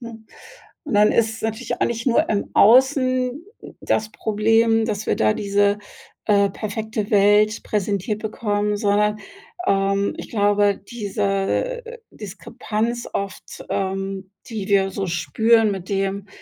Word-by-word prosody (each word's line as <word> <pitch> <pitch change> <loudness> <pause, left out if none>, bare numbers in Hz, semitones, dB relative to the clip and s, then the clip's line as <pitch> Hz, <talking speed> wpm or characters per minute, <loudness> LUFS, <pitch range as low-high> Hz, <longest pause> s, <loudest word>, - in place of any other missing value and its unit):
ne? 230 -2 -9 0.7
Und 295 - -4
dann 210 +1 +5
ist 225 -1 0
natürlich 225 +2 -3
auch - - +3
nicht 235 +1 -4
nur 240 - +3
im 205 -1 -1
Außen 255 +3 +4 0.2
d - - -12
das 215 0 -1
Problem, 225 +1 +2
dass 210 -1 -3
wir - - +1
da 110 0 +2
diese, 205 0 +1 0.5
äh, 200 -1 +4
perfekte 215 +1 -4
Welt 210 +1 +4
präsentiert 205 0 -2
bekommen, 210 -1 -1
sondern, 210 0 +1 0.5
ähm, 195 0 +1
ich - - -8
glaube, 205 -2 +2
diese 205 - -1 0.3
Diskrepanz 225 +2 -4
oft, 200 -1 -6
ähm, 195 0 -3 0.2
die 215 -4 -5
wir 195 -1 +3
so 195 0 -3
spüren 220 +6 +2
mit 190 -2 -7
dem, 195 0 -2
210 Hz, 130 wpm, -21 LUFS, 200-225 Hz, 0.7 s, dann